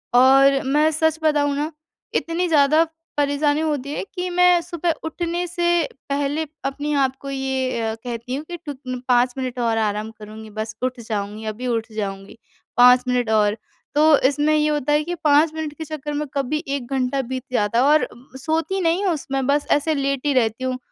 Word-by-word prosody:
और 270 +2 +6
मैं 300 +4 +3
सच 320 +1 +1
बताऊँ 290 -2 +2
ना 300 +3 -2 0.4
इतनी 340 +2 0
ज़्यादा 310 0 +4 0.3
परेशानी 290 +1 +1
होती 290 -3 -2
है - - -3
कि 360 0 -2
मैं 360 0 +4
सुबह 340 0 -2
उठने 345 +2 -2
से 345 -1 +1 0.3
पहले 285 +3 -1 0.2
अपने 290 +2 -2
आप 265 0 0
को 275 - -6
ये 265 -2 -2
अ, 220 0 -2
कहती 245 +1 -4
हूँ 300 +3 -5
कि 345 - -4
ट 285 - -4 0.3
5 245 0 +3
मिनट 255 -1 -4
और 230 -1 +1
आराम 215 0 -1
करूँगी 215 0 -11
बस 220 +1 -5
उठ 255 -1 -1
जाऊँगी, 215 -1 -4
अभी 225 +4 -4
उठ 225 -1 -2
जाऊँगी 195 0 -5 0.4
5 250 +1 +7
मिनट 245 -2 0
और। 210 0 +3 0.4
तो 305 -1 +6
इसमें 295 +2 +1
ये 300 0 +2
होता 295 -1 0
है 300 - +3
कि 350 +3 -4
5 300 +1 +4
मिनट 315 -2 -4
के 320 - -5
चक्कर 295 -1 -5
में 295 0 -2
कभी 280 +2 -1
1 275 -3 -3
घंटा 265 +1 0
बीत 255 -1 -3
जाता 210 +1 +1
है - - +4
और 300 +1 +4 0.3
सोती 325 +6 -1
नहीं 345 +4 +1
हूँ 360 - +2
उसमें 270 -3 -3
बस 290 +1 +1
ऐसे 295 +2 +2
लेटी 275 +1 0
रहती 235 -1 +1
हूँ। 255 0 -1
280 Hz, 190 wpm, -22 LUFS, 245-310 Hz, 0.4 s, 5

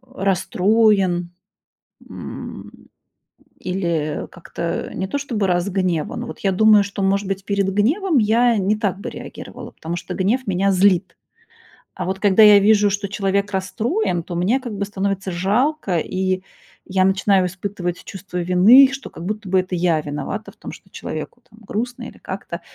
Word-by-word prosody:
расстроен, 190 -1 +2 0.8
м, - - -8 0.9
или 170 -5 -2
как-то 170 -1 -5
не 190 - -2
то 285 - -2
чтобы 230 -8 -2
разгневан. 180 -2 -1
Вот 155 - -8
я 195 -1 +1
думаю, 210 +1 +5
что, 200 0 -5
может 195 +1 +1
быть, 195 0 -3
перед 200 -1 0
гневом 285 - +2
я 230 +2 +3
не 200 +2 +1
так 200 -3 -1
бы - - -5
реагировала, - - -9
потому 170 +2 -5
что 175 - -6
гнев 225 +7 0
меня 195 +1 +1
злит. 185 -1 +2 0.8
А - - -4
вот 190 +1 -3
когда 205 +1 +5
я 205 -1 +9
вижу, 205 0 +4
что 200 +1 -2
человек 200 0 -1
расстроен, 190 -1 -1
то 175 - -7
мне 195 +10 +1
как 240 -5 -7
бы 200 - -1
становится 195 -1 -3
жалко, 205 - 0
и 185 +2 -1 0.5
я 185 0 +2
начинаю 190 0 +3
испытывать 180 -1 -4
чувство 190 -2 -7
вины, 195 +10 +7
что 270 0 -7
как 165 - -9
будто 210 +2 -4
бы 185 0 +3
это 185 0 -3
я 170 -3 +1
виновата 150 +9 -5
в - - -26
том, - - -8
что - - -14
человеку, - - -7
там, 220 +1 -19
грустно 235 +4 -4
или - - -10
как-то. - - -7
195 Hz, 160 wpm, -20 LUFS, 185-210 Hz, 0.9 s, я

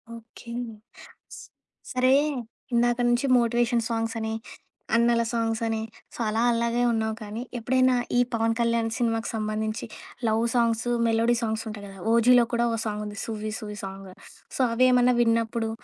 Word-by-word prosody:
Okay. 230 +1 -11 1.4
సరే, 255 +1 +3 0.6
ఇందాక 240 +1 +2
నుంచి 240 +3 +2
మోటివేషన్ 235 0 +1
సాంగ్స్ 225 0 -2
అని, 220 0 -3 0.6
అన్నల 235 0 +3
సాంగ్స్ 225 -1 -1
అని, 225 -1 -1 0.3
సో, - - -12
అలా 220 +2 0
అలాగే 235 +1 0
ఉన్నావు 220 -1 -1
కానీ, 215 +3 -6 0.2
ఎప్పుడైనా 255 +2 +3 0.2
ఈ - - +5
'పవన్ 225 0 +1
కళ్యాణ్' 230 -1 +1
సినిమాకు 225 -1 0
సంబంధించి, 215 +1 -2 0.4
లవ్ 220 +1 +1
సాంగ్సు, 235 0 +1 0.2
మెలోడీ 230 +1 +2
సాంగ్స్ 220 -1 -2
ఉంటాయి 205 -1 -8
గదా! 195 0 -12 0.2
'ఓజీలో' 240 +1 +5
కూడా 235 0 +2
ఓ - - -1
సాంగుంది 210 -1 -4
'సువ్వి 215 -1 -4
సువ్వి' 210 -2 -7
సాంగ్. 195 0 -9 0.5
సో, - - 0
అవేమన్నా 250 0 +4
విన్నప్పుడు, 230 -1 +1
230 Hz, 140 wpm, -26 LUFS, 220-235 Hz, 1.4 s, ఈ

